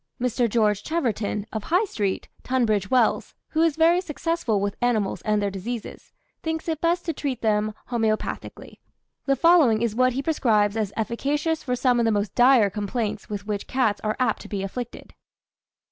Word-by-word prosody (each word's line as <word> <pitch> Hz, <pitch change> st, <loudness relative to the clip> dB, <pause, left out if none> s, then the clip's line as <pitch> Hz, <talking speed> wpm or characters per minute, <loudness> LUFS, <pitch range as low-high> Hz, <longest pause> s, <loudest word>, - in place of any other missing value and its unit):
Mr. 245 Hz, -1 st, +1 dB
George 210 Hz, -2 st, +2 dB
Cheverton, 225 Hz, -10 st, -2 dB
of 220 Hz, -2 st, -4 dB
High 360 Hz, +6 st, +2 dB
Street, 205 Hz, -, -2 dB
Tunbridge 220 Hz, -7 st, 0 dB
Wells, 250 Hz, -4 st, +1 dB
who 320 Hz, -, 0 dB
is 325 Hz, -3 st, +3 dB
very 335 Hz, +3 st, +4 dB
successful 325 Hz, -, -1 dB
with 200 Hz, 0 st, -2 dB
animals 225 Hz, -5 st, 0 dB
and 210 Hz, -1 st, +1 dB
their 200 Hz, -1 st, -1 dB
diseases, 215 Hz, +4 st, -6 dB, 0.3 s
thinks 320 Hz, 0 st, -3 dB
it 320 Hz, -2 st, -2 dB
best 345 Hz, +1 st, +1 dB
to 330 Hz, -, -1 dB
treat 275 Hz, -5 st, -4 dB
them 215 Hz, -1 st, +1 dB, 0.2 s
homoeopathically. 220 Hz, -2 st, -3 dB, 0.5 s
The 275 Hz, -, +3 dB
following 270 Hz, -8 st, +4 dB
is 230 Hz, -3 st, 0 dB
what 255 Hz, +2 st, +2 dB
he 270 Hz, +2 st, -2 dB
prescribes 220 Hz, -10 st, +2 dB
as 215 Hz, -3 st, -1 dB
efficacious 290 Hz, +8 st, -1 dB
for 250 Hz, -2 st, -1 dB
some 250 Hz, -1 st, +2 dB
of 235 Hz, -, +2 dB
the 225 Hz, -, +3 dB
most 205 Hz, -1 st, -1 dB
dire 245 Hz, -5 st, +5 dB
complaints 210 Hz, 0 st, -3 dB
with 205 Hz, -1 st, -5 dB
which 205 Hz, -1 st, -3 dB
cats 235 Hz, -6 st, 0 dB
are 215 Hz, 0 st, -1 dB
apt 255 Hz, -, +1 dB
to -, -, -10 dB
be 200 Hz, -3 st, -3 dB
afflicted. 240 Hz, +5 st, -7 dB
235 Hz, 175 wpm, -24 LUFS, 210-275 Hz, 0.5 s, dire